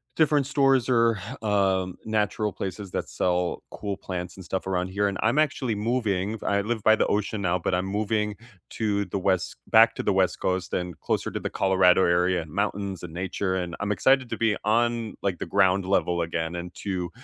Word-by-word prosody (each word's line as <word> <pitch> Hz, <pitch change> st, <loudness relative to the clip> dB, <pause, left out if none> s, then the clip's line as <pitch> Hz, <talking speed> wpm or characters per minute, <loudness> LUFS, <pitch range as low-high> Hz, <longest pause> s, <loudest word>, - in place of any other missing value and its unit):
different 150 Hz, -3 st, +3 dB
stores 135 Hz, -3 st, +2 dB
or, 115 Hz, -3 st, +3 dB, 0.3 s
um, 95 Hz, -3 st, +1 dB
natural 105 Hz, -1 st, 0 dB
places 95 Hz, 0 st, -6 dB
that -, -, -3 dB
sell 90 Hz, -1 st, -1 dB
cool 100 Hz, -1 st, -4 dB
plants 90 Hz, -2 st, -6 dB
and 95 Hz, -, -10 dB
stuff 95 Hz, +2 st, -4 dB
around 90 Hz, -1 st, -1 dB
here, 100 Hz, +2 st, 0 dB
and 100 Hz, -1 st, -2 dB
I'm 120 Hz, +7 st, +2 dB
actually 140 Hz, -7 st, 0 dB
moving, 105 Hz, -2 st, -1 dB
I 100 Hz, -, +1 dB
live 110 Hz, 0 st, -3 dB
by 110 Hz, 0 st, +5 dB
the -, -, +2 dB
ocean 105 Hz, 0 st, -1 dB
now, 90 Hz, -1 st, +1 dB
but 90 Hz, -, -2 dB
I'm 90 Hz, +1 st, 0 dB
moving 105 Hz, +1 st, -1 dB, 0.4 s
to 100 Hz, -2 st, -1 dB
the -, -, -4 dB
west 95 Hz, -1 st, 0 dB
back -, -, +6 dB
to -, -, -4 dB
the -, -, +2 dB
West -, -, +1 dB
Coast, 95 Hz, -1 st, -1 dB
and 90 Hz, -2 st, -3 dB
closer -, -, -1 dB
to -, -, -3 dB
the -, -, -3 dB
Colorado 95 Hz, -1 st, +4 dB
area, 90 Hz, 0 st, +2 dB
and 80 Hz, -, -11 dB
mountains 100 Hz, -1 st, -2 dB
and 80 Hz, -2 st, -8 dB
nature, 95 Hz, +1 st, -2 dB
and 90 Hz, -2 st, -3 dB
I'm 100 Hz, +1 st, 0 dB
excited 130 Hz, +5 st, +3 dB
to -, -, -3 dB
be 110 Hz, -2 st, +1 dB
on, 115 Hz, 0 st, +1 dB
like, 95 Hz, -3 st, -1 dB
the -, -, -3 dB
ground 95 Hz, -1 st, +2 dB
level 90 Hz, -2 st, +1 dB
again, 85 Hz, 0 st, -2 dB
and 85 Hz, +1 st, -7 dB
to, 90 Hz, -3 st, -3 dB
100 Hz, 200 wpm, -26 LUFS, 90-110 Hz, 0.4 s, back